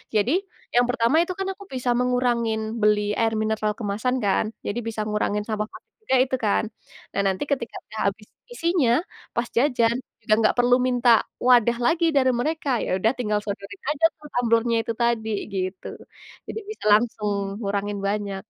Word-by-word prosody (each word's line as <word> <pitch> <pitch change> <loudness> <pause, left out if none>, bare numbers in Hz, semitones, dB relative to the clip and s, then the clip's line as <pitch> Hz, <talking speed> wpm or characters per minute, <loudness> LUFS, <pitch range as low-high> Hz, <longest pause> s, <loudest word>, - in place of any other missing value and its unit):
Jadi, 215 +5 +3 0.4
yang 245 0 +5
pertama 245 +2 +2
itu, 365 - -5
kan, 385 - -1
aku 400 - -13
bisa 250 -1 -2
mengurangin 245 -3 +1 0.2
beli 210 0 +4 0.2
air 225 -1 +2
mineral 215 -1 0
kemasan, 220 +4 -1
kan. 195 +2 +2 0.2
Jadi, 215 +4 -2
bisa 220 -1 -3
ngurangin 210 0 0
sampah 210 -1 -2
plastik - - -15
juga, 265 - +1
itu, 260 0 -1
kan. 205 - +2 0.5
Nah, 200 - +1
nanti 190 +4 0
ketika 245 -4 -2
udah 215 0 -8
habis 210 +1 -17 0.3
isinya, 335 - +1 0.4
pas 235 0 0
jajan, 240 -3 +3 0.3
udah 215 - +4
nggak 215 - +3
perlu 245 0 +5
minta 245 -1 +2 0.4
wadah 235 -1 +5
lagi, 335 +1 +3
dari 260 -2 +4
mereka. 310 +1 -1 0.2
Ya - - -4
udah, 225 +4 +3
tinggal 210 -3 0
sodorin 200 -1 -6
aja, 305 +2 +2
tuh, 300 0 -12
tumblernya 230 -1 +2
itu 230 - -3
tadi, 235 -2 +1 0.2
gitu. 185 0 -3 0.6
Jadi - - -4
bisa 430 - -8
langsung 210 -2 0
ngurangin 200 0 -2
banyak. 200 -1 -2
230 Hz, 170 wpm, -24 LUFS, 210-250 Hz, 0.6 s, yang